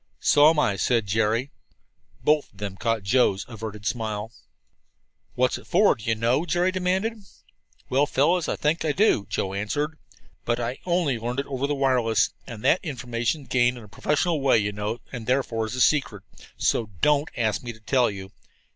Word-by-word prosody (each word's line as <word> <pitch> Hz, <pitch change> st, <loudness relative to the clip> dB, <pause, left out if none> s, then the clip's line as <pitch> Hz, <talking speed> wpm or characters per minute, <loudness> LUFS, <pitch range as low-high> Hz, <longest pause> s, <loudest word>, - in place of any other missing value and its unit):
"So 145 Hz, +1 st, +6 dB
am 160 Hz, -, +1 dB
I," 100 Hz, -9 st, +2 dB
said 115 Hz, +1 st, +1 dB
Jerry. 110 Hz, +6 st, 0 dB, 0.7 s
Both 150 Hz, -1 st, +2 dB
of 100 Hz, -, -25 dB
them 100 Hz, -2 st, -5 dB
caught 115 Hz, 0 st, -1 dB
Joe's 100 Hz, -2 st, +2 dB
averted 110 Hz, -3 st, -8 dB
smile. 110 Hz, -2 st, -3 dB, 1.0 s
"What's -, -, +1 dB
it -, -, -17 dB
for, -, -, +4 dB
do 110 Hz, -, -13 dB
you 115 Hz, 0 st, +1 dB
know?" 120 Hz, +7 st, +1 dB
Jerry 175 Hz, +1 st, +1 dB
demanded. 190 Hz, +5 st, -1 dB, 0.7 s
"Well, 140 Hz, +3 st, +2 dB
fellows, 160 Hz, +6 st, +2 dB
I -, -, -1 dB
think 155 Hz, +3 st, 0 dB
I 155 Hz, -2 st, +1 dB
do," 185 Hz, -, +2 dB
Joe 95 Hz, -, -2 dB
answered. 145 Hz, +10 st, -2 dB, 0.4 s
"But 120 Hz, 0 st, -1 dB
I 120 Hz, +2 st, -3 dB
only 170 Hz, -9 st, +1 dB
learned 120 Hz, +4 st, -2 dB
it -, -, -10 dB
over 135 Hz, 0 st, -2 dB
the 145 Hz, -, -1 dB
wireless 125 Hz, -5 st, +2 dB, 0.2 s
and 115 Hz, -3 st, -8 dB
that's 185 Hz, -, +3 dB
information 125 Hz, -1 st, -2 dB
gained 125 Hz, -1 st, +1 dB
in 120 Hz, -, -10 dB
a -, -, -13 dB
professional 150 Hz, -, 0 dB
way, 135 Hz, -3 st, +4 dB
you 105 Hz, -1 st, 0 dB
know, 105 Hz, +2 st, -3 dB
and 120 Hz, -3 st, -7 dB
therefore 120 Hz, -4 st, 0 dB
secret. 120 Hz, -4 st, +1 dB, 0.3 s
So 110 Hz, -3 st, 0 dB
don't 150 Hz, 0 st, +3 dB
ask 110 Hz, -3 st, 0 dB
me 120 Hz, -, -6 dB
to 110 Hz, -, -15 dB
tell 125 Hz, +2 st, +2 dB
you. 95 Hz, -1 st, -8 dB
120 Hz, 180 wpm, -25 LUFS, 110-145 Hz, 1.0 s, So